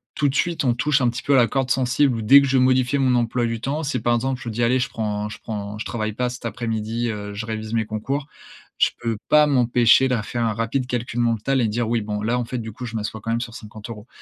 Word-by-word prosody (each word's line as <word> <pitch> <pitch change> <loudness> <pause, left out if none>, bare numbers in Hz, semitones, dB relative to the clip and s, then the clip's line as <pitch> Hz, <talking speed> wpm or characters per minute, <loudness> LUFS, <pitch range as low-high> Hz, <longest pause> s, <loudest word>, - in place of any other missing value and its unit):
tout 145 - +2
de 135 - -4
suite, 170 0 0
on 120 - +3
touche 145 +3 +1
un 125 - +3
petit 120 +1 -5
peu 140 - +2
à 135 - +6
la 120 -2 +5
corde 135 -2 -1
sensible 130 +1 +2
où, - - -3
dès 135 +6 +7
que 140 - 0
je 130 - +2
vais 130 - +4
modifier 130 +1 +2
mon 130 -2 +3
emploi 120 0 +1
du 115 -1 -3
temps, 145 +4 -2
c'est 135 -4 -1
par 120 +1 +2
exemple, 130 +1 -2
je 120 - -4
dis: 115 +2 -1
«Allez, 125 +2 +3
je - - -1
prends 105 -1 -3
je - - -9
prends, 105 -1 -5
je 110 - -5
travaille 110 -2 -3
pas 125 +3 -1
cet 125 -1 -8
après-midi, 115 +1 -2
heu, 105 -1 -5
je 105 +2 -5
révise 110 0 -5
mes 110 -1 +1
concours», 135 +7 -3 0.5
je - - +5
peux 115 -2 -1
pas 150 0 +6
m'empêcher 125 -1 +4
de 125 - +2
faire 120 +2 -3
un 110 - 0
rapide 115 +4 -2
calcul 120 -2 -3
mental 120 +3 +1
et 115 - +2
dire: 115 +2 -1
«Oui, 115 -1 +1
bon, 105 0 -4
là, 115 +3 0
en 120 - -2
fait, 125 - -4
du 110 -1 -6
coup, 125 +2 -7
je 115 - -7
m'assois 110 0 -4
quand 115 - -6
même 115 +1 0
sur 115 -2 -6
50€» 105 +1 -9
120 Hz, 285 wpm, -22 LUFS, 110-130 Hz, 0.5 s, dès